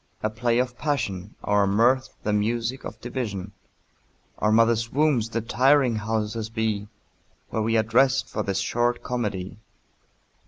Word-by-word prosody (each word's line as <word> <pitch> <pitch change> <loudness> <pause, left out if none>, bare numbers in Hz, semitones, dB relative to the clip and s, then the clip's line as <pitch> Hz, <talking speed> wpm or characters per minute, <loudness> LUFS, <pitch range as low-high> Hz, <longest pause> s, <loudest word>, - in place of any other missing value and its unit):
A 110 - 0
play 120 +1 0
of 125 -1 -1
passion, 105 - -2
Our 100 -1 +2
mirth 120 +6 +3
the 105 - 0
music 115 +5 -1
of - - -7
division, 110 -6 -4 0.9
Our 105 - +2
mother's 115 +1 +3
wombs 140 -6 +2
the 115 0 -2
tiring 130 +1 +3
houses 110 +1 -2
be, 110 -2 -2 0.6
Where 110 - -1
we 115 +1 +1
are 110 - +3
dressed 125 +4 +3
for 110 - -3
this 100 -2 -2
short 120 +5 0
comedy. 105 -5 -3
115 Hz, 145 wpm, -25 LUFS, 105-120 Hz, 0.9 s, mirth